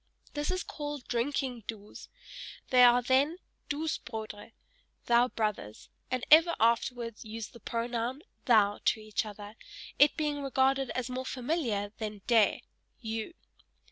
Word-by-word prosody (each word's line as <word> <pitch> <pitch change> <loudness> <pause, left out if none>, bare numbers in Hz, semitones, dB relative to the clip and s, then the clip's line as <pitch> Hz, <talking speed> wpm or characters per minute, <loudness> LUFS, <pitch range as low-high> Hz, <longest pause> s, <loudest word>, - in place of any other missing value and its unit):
This 295 0 -2
is 370 0 -1
called 290 -3 -6
drinking 245 -1 -2
"Duus": 210 -2 -9 0.6
they 250 -1 +7
are 245 0 +6
then, 270 +7 +2 0.3
"Duus 310 +2 -2
Brodre," 220 -2 -8 0.5
(thou 240 +1 +4
brothers) 210 - -4 0.2
and 255 0 -2
ever 330 +2 +7
afterwards 230 0 0
use 220 0 -7
the 235 - -14
pronoun 235 +5 -3 0.2
"thou," 210 -4 +4
to 220 - +3
each 215 0 -3
other, 205 0 -9 0.5
it 290 - +6
being 295 -2 -1
regarded 270 -1 +1
as 255 0 -3
more 255 +1 -3
familiar 240 -7 -2
than 210 -3 -5
"De," 225 -4 +3 0.4
(you). 225 +6 -5
240 Hz, 135 wpm, -30 LUFS, 220-275 Hz, 0.6 s, they